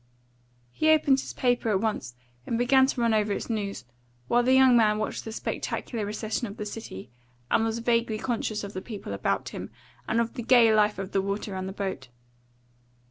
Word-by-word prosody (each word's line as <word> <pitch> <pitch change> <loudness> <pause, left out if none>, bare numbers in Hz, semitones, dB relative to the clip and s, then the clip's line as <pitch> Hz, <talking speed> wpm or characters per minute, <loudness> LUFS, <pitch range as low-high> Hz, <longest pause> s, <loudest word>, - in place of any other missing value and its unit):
He 310 - +1
opened 295 -4 +4
his - - -6
paper 245 -2 +1
at 200 -3 +2
once 205 - -2 0.3
and 230 - 0
began 265 +2 +4
to 260 - -2
run 230 -1 +3
over 210 -1 +1
its 230 - -4
news, 200 - -3 0.4
while 240 - +3
the 255 +2 +3
young 260 -1 +6
man 215 -2 +4
watched 215 - -3
the 220 - -5
spectacular 220 0 -3
recession 215 +3 -3
of 205 - -9
the 210 - -4
city, 205 - -8 0.4
and 225 - +3
was 225 0 -1
vaguely 230 -1 +1
conscious 220 -2 -2
of 200 0 -7
the 185 - -5
people 210 -1 -7
about - - -1
him, - - -7 0.4
and 225 - +1
of 235 0 -1
the 245 - -5
gay 235 -2 +5
life 210 -1 +3
of 195 0 -5
the 195 - +1
water 200 +2 -3
round 190 0 -4
the - - -7
boat. 190 -10 -4
220 Hz, 200 wpm, -27 LUFS, 205-240 Hz, 0.4 s, young